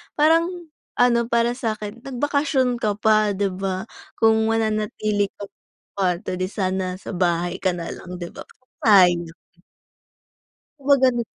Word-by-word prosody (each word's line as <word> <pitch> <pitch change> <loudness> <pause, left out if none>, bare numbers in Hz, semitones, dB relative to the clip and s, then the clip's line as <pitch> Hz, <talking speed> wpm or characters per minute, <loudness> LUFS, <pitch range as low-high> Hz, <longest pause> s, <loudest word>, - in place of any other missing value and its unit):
Parang, 325 +3 +4 0.5
ano 235 -1 +3
para 235 0 +2
sa'kin 220 -3 -4
nagbakasyon 270 -2 0
ka 210 -2 0
pa, 215 -1 +2
'di 200 0 0
ba 185 0 -3 0.3
kung 220 0 +3
mananatili 215 -2 0
ka 205 - -9
sa 200 0 -17
kwarto, 180 -2 0
di 185 - -1
sana 185 -2 -2
sa 190 - -8
bahay 175 0 0
ka 185 -2 0
na 170 -1 -5
lang 180 0 -8
'di 175 -1 -7
ba, - - -11 0.3
sayang. 175 -5 +4 1.4
'Di 275 - -18
ba 280 - +7
ganun? 240 -2 +3
210 Hz, 140 wpm, -22 LUFS, 185-235 Hz, 1.4 s, ba